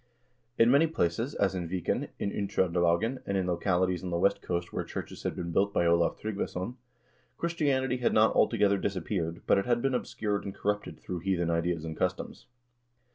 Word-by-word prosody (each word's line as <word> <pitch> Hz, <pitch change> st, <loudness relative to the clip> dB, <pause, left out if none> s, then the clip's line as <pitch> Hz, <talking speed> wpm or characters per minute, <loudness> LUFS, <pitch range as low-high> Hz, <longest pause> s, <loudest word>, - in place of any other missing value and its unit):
In 115 Hz, +1 st, +6 dB
many 145 Hz, +4 st, +5 dB
places, 115 Hz, -, -1 dB
as 95 Hz, -1 st, +1 dB
in 90 Hz, -3 st, -3 dB
Viken, 90 Hz, -1 st, -1 dB
in 100 Hz, -, -2 dB
Uttr0nde 95 Hz, -4 st, 0 dB
lagen, 85 Hz, +10 st, +2 dB
and 100 Hz, -, 0 dB
in 95 Hz, -, 0 dB
localities 90 Hz, 0 st, 0 dB
on 90 Hz, -, -3 dB
the 85 Hz, -, -1 dB
west 100 Hz, +3 st, +2 dB
coast 85 Hz, -1 st, -3 dB
where -, -, -1 dB
churches -, -, -7 dB
had -, -, -2 dB
been 85 Hz, -1 st, -4 dB
built 100 Hz, +4 st, +2 dB
by 85 Hz, -, +3 dB
Olav 85 Hz, 0 st, +3 dB
Tryggvason, 100 Hz, 0 st, -3 dB, 0.6 s
Christianity 140 Hz, -7 st, 0 dB
had 125 Hz, -, +1 dB
not 110 Hz, +1 st, +4 dB
altogether 100 Hz, -3 st, +3 dB
disap 95 Hz, -4 st, -2 dB
peared, 85 Hz, -4 st, -2 dB
but -, -, +4 dB
it 100 Hz, -, -3 dB
had 120 Hz, -1 st, +3 dB
been 135 Hz, +2 st, 0 dB
obscured 105 Hz, -4 st, -2 dB
and 100 Hz, -, -6 dB
corrupted 105 Hz, 0 st, -2 dB
through 90 Hz, -1 st, -5 dB
heathen 85 Hz, -2 st, 0 dB
ideas 85 Hz, -1 st, 0 dB
and 80 Hz, -1 st, -5 dB
customs. -, -, -3 dB
95 Hz, 190 wpm, -29 LUFS, 85-110 Hz, 0.6 s, In